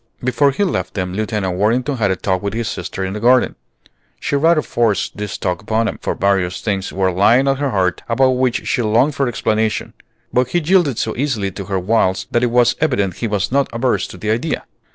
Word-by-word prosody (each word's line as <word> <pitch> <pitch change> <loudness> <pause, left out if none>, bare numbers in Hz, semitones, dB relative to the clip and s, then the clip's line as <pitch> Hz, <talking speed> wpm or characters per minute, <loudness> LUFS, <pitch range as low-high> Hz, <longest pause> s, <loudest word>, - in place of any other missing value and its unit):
Before 125 +3 +3
he 140 +9 0
left 185 - -2
them 90 -2 -2
Lieutenant 105 -3 -2
Worthington 125 +7 +1
had 105 -4 +1
a 95 - +1
talk 95 0 -1
with 100 0 -3
his 115 -1 -2
sister 95 +1 -4
in 95 - -4
the 105 - -4
garden. 125 +3 +3 0.7
She - - -2
rather 160 +2 +3
forced 110 -5 0
this 105 -1 -4
talk 90 +2 -2
upon 110 +2 0
him, - - -4
for - - -2
various 95 -2 0
things 100 -3 -2
were 95 -1 0
lying 110 +9 +4
at 135 0 +1
her 145 -1 0
heart 95 -5 0
about 130 +3 +3
which 125 -1 0
she - - +1
longed 120 +7 +2
for 135 -1 0
explanation; 110 -2 -1 0.4
but 125 0 +2
he 175 - 0
yielded 165 - +2
so 110 - -2
easily 115 -8 -1
to 100 +1 -7
her 95 0 -2
wiles 95 0 +1
that 120 - +2
it 125 - +3
was 120 0 +3
evident 100 - 0
he 120 - -2
was 105 -1 -1
not 140 +1 +2
averse 120 +2 0
to - - -11
the 105 - -2
idea. 120 +8 -2
115 Hz, 220 wpm, -18 LUFS, 100-130 Hz, 0.7 s, lying